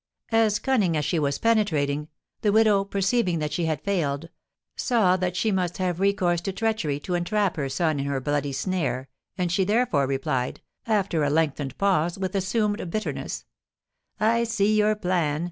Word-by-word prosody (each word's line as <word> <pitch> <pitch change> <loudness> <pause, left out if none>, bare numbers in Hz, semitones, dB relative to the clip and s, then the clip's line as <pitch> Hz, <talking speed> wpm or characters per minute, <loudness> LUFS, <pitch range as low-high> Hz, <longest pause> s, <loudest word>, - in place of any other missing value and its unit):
As 225 -2 +3
cunning 210 - +1
as 150 - -1
she 165 +2 0
was 140 -2 0
penetrating, 155 -11 +1 0.3
the 210 - +2
widow, 210 -2 +4
perceiving 195 -1 0
that 150 -1 -2
she 170 +2 0
had 155 -2 -2
failed, 165 -5 -1 0.5
saw 220 -8 +2
that 180 -1 -2
she 220 - +1
must 180 -3 -1
have 180 -2 -1
recourse 190 -3 +2
to 195 - -3
treachery 190 -9 -1
to 180 - -4
entrap 190 +2 0
her 140 -3 -2
son 155 0 0
in 140 - -2
her 140 -1 -1
bloody 145 +1 -1
snare, 135 -3 -2 0.3
and 180 -2 0
she 190 +2 +2
therefore 205 - +2
replied, 135 -1 -1 0.3
after 195 -7 +1
a 145 - +2
lengthened 145 -3 0
pause, 180 -4 +1
with 190 -1 -3
assumed 205 0 0
bitterness: 215 +5 -4 0.7
"I 230 +2 +3
see 215 -2 +1
your 215 0 +3
plan. 175 -7 0
180 Hz, 170 wpm, -25 LUFS, 150-210 Hz, 0.7 s, widow